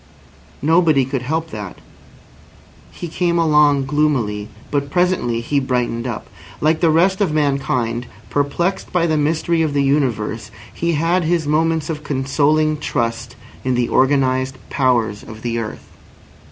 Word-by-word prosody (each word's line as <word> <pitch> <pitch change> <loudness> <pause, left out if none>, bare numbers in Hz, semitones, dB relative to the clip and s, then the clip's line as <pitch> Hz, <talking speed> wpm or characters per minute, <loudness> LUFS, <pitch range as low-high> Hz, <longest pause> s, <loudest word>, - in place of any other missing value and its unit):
Nobody 160 -3 +4
could 135 -1 -3
help 160 +5 -2
that! 105 -3 -7 1.1
He 175 - -7
came 170 +1 0
along 150 -4 +4
gloomily, 130 -8 0 0.2
but 140 -1 -1
presently 175 -10 +1
he 140 +4 0
brightened 125 -2 -1
up. 120 -3 -5 0.3
Like 155 +1 +2
the 170 - +3
rest 185 +5 +3
of 190 -6 +2
mankind, 135 -5 0 0.2
perplexed 160 +7 -1
by 175 -2 +2
the 160 -2 +1
mystery 160 +2 +1
of 155 -3 0
the 140 - +3
universe, 115 -6 0 0.2
he 170 0 -1
had 165 +3 +1
his 165 -1 +1
moments 160 +1 +1
of 150 -2 -4
consoling 150 +2 +1
trust 120 -3 -2 0.3
in 130 -1 0
the 120 -1 0
organised 130 -1 +2
powers 120 -6 +1
of 110 0 -11
the 115 -1 -1
earth. 110 -2 -6
145 Hz, 140 wpm, -19 LUFS, 125-160 Hz, 1.1 s, Nobody